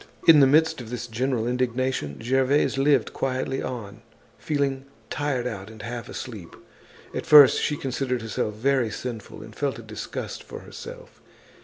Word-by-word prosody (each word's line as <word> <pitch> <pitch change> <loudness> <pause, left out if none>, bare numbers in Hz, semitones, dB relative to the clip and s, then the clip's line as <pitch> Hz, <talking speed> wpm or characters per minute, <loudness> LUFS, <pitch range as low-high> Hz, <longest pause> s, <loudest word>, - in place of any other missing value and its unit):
In 160 -3 +9
the 135 - +7
midst 160 +1 +3
of 115 - -9
this 120 0 -4
general 120 0 -1
indignation, 125 - -1
Gervaise 135 +4 +2
lived 135 -4 +3
quietly 135 0 -2
on, 110 -4 -6 0.4
feeling 140 -3 -1 0.3
tired 135 -4 -1
out 105 -5 -5
and 110 -1 -11
half 120 +1 -6
asleep. 110 -10 -8 0.6
At - - -4
first 145 -3 +8
she 150 - 0
considered 130 -3 -2
herself 105 -1 -2
very 130 +1 +1
sinful 110 -1 -7
and 110 -1 -12
felt 140 -1 -1
a - - -9
disgust - - -6
for - - -9
herself. - - -11
130 Hz, 155 wpm, -25 LUFS, 115-140 Hz, 0.6 s, In